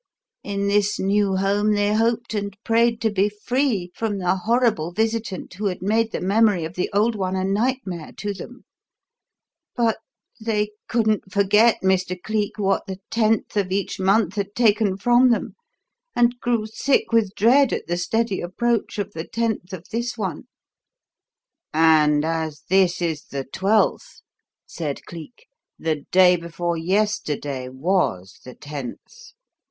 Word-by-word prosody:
In 200 0 -2
this 205 0 +2
new 195 0 +1
home 200 +2 +1
they 205 0 +1
hoped 230 +1 0
and 200 -2 -3
prayed 230 0 +2
to 220 -1 +1
be 200 +1 +2
free 210 -3 -1
from 220 -3 -2
the 180 -1 +1
horrible 215 -5 +1
visitant 220 -2 -2
who 205 +3 -2
had 180 -1 -4
made 225 +3 +1
the - - -3
memory 200 -2 +2
of 160 - -7
the 180 - -2
old 215 +4 +2
one 190 -3 -2
a 185 - -1
nightmare 200 -4 -2
to 205 -1 -3
them, 245 +5 -11 1.1
but 230 -2 +1 0.4
they 210 -2 0 0.2
couldn't 215 -4 0
forget, 210 +4 +4
Mr. 185 -1 +1
Cleek, 210 +2 -2
what 195 -2 0
the 190 -1 -5
Tenth 220 -2 +1
of 195 -3 0
each 195 +1 -2
month 195 0 +2
had 200 0 -3
taken 215 -4 +2
from 245 +4 +4
them, 235 - 0 0.6
and 240 0 +2
grew 235 -3 0
sick 245 +6 0
with 220 -4 +2
dread 255 +5 +4
at - - -2
the 175 - -1
steady 225 +3 -1
approach 230 +7 -1
of 205 0 -3
the 160 +1 -6
Tenth 225 -5 -2
of 185 -2 -8
this 235 +2 -3
one." 205 +3 -4 1.3
"And 155 -2 +4
as 160 -2 -3
this 185 -2 +3
is 160 -3 -2
the 140 -1 -5
Twelfth," 195 +10 0 0.4
said 150 -5 -5
Cleek, 175 - -11 0.3
"the 155 -3 -2
day 180 -1 +6
before 170 0 -3
yesterday 160 -8 -1
was 130 - -1
the 125 - -11
Tenth. 150 - -9
200 Hz, 150 wpm, -22 LUFS, 180-225 Hz, 1.3 s, day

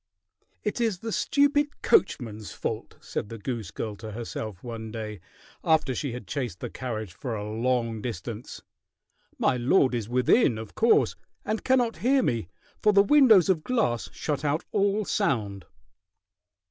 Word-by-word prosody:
"It 210 +3 -2
is 225 -5 +1
the 225 +5 -5
stupid 290 +4 +1
coachman's 110 - +1
fault," - - -4
said 105 - -4
the 115 - -7
goose 115 0 -4
girl 110 -2 -5
to 110 0 -8
herself 110 -4 -6
one 115 -2 -6
day, 110 -3 -5 0.4
after 160 -5 +3
she 135 +1 -3
had 125 +1 -7
chased 125 - -4
the - - -5
carriage 110 -7 -5
for 115 +4 -4
a 105 0 -4
long 115 0 -1
distance. 115 0 -6 0.7
"My 125 - +2
lord 130 +2 +3
is 115 -3 -2
within, 125 - +3
of 110 -1 -8
course, 230 +1 +3 0.3
and 215 +1 -2
cannot 250 -3 +2
hear 265 +2 +3
me, 115 -7 0 0.3
for 210 - +5
the 200 0 +7
windows 225 - +6
of 175 -5 +2
glass 175 - 0
shut 150 -1 -3
out 150 +3 0
all 205 +1 +1
sound." 100 - -1
125 Hz, 155 wpm, -27 LUFS, -, 0.7 s, the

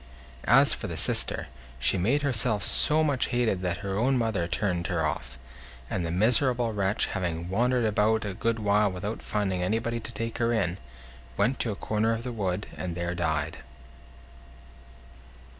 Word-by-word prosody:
As - - +6
for - - -5
the - - -5
sister, - - +1 0.3
she 65 +9 +4
made 120 +11 +1
herself 115 -6 +1
so 155 +7 +4
much 140 -4 +1
hated 120 -7 0
that 90 +2 -2
her 100 +1 -1
own 130 +3 +2
mother 110 -8 0
turned 90 -2 -1
her 85 -3 0
off; 65 -4 -4 0.5
and 90 - -1
the 85 - -2
miserable 120 - +2
wretch, 100 0 +1
having 85 -1 -3
wandered 120 +4 +1
about 110 +1 +2
a 100 - -3
good 115 +4 -1
while 105 -1 +2
without 100 +5 -5
finding 95 -3 -1
anybody 115 +5 -1
to 115 - -8
take 115 +1 -4
her 115 0 +2
in, 95 -5 0 0.6
went 130 +2 +1
to 115 - 0
a - - -4
corner 110 +3 0
of 115 +1 -4
the 125 - -4
wood, 100 -3 -2
and 90 -2 -4
there 85 0 -2
died. 80 -3 -1
105 Hz, 170 wpm, -27 LUFS, 90-115 Hz, 0.6 s, As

